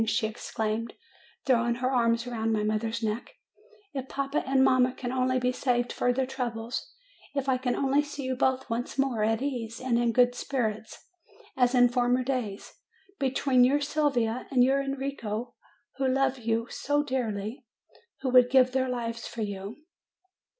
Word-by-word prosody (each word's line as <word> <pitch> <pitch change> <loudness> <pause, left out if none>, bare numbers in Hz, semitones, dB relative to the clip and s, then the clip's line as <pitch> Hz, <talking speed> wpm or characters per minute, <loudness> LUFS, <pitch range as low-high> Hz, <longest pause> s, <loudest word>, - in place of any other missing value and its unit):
she 220 - +1
exclaimed, 220 +1 -3 0.5
throwing 240 -2 +2
her 255 +2 -1
arms 230 -2 +2
around 225 -2 -2
my 215 -1 +1
mother's 220 +2 -1
neck, 220 +2 -3 0.6
"if 265 -2 -5
papa 275 +1 -1
and 265 0 +4
mamma 255 -1 +4
can 245 -1 -4
only 255 0 +1
be 250 0 +1
saved 245 -2 0
further 245 +2 +1
troubles, 240 -2 -4 0.4
if 275 -1 -1
I 260 -1 +2
can 250 -1 0
only 275 +1 +2
see 290 -1 -7
you 260 0 -1
both 260 0 +1
once 240 +2 -3
more 265 -6 +1
at 225 +3 +1
ease, 235 -5 -3
and 245 -2 +1
in 240 -1 +2
good 245 +1 +4
spirits, 225 -5 -3 0.5
as 250 0 +3
in 245 0 +7
former 245 +1 +1
days, 245 -6 -3 0.5
between 265 -1 +3
your 275 +4 +4
Sylvia 280 -5 0
and 255 -3 +4
your 270 +2 +3
Enrico, 270 -4 -4 0.4
who 270 -1 +1
love 270 0 +1
you 230 0 0
so 290 +1 0
dearly, 245 -2 -3 0.6
who 265 - -1
would 250 -1 +6
give 255 -1 +5
their 260 0 0
lives 235 -2 -3
for 230 - -4
you 205 +7 -6
250 Hz, 165 wpm, -28 LUFS, 230-265 Hz, 0.6 s, in